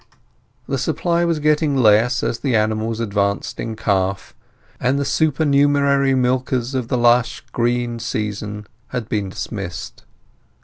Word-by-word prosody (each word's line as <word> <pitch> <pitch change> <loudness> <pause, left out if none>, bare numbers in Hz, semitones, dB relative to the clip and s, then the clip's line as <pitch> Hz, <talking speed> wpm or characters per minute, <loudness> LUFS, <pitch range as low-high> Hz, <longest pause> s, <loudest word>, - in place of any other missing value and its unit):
The - - -1
supply 170 -1 0
was 165 -2 +1
getting 150 -1 +2
less 115 +1 +4
as 120 - -1
the 130 -2 0
animals 110 +1 0
advanced 100 -2 -1
in 115 -1 -4
calf, 95 -3 -1 0.5
and 130 +3 +1
the 140 - -1
supernumerary 140 -2 +2
milkers 125 0 0
of 130 -3 -2
the 125 - 0
lush 120 0 +3
green 120 0 -1
season 105 -1 -4 0.2
had 120 -4 -4
been 105 -3 -2
dismissed. 95 -4 -6
120 Hz, 130 wpm, -20 LUFS, 110-140 Hz, 0.5 s, less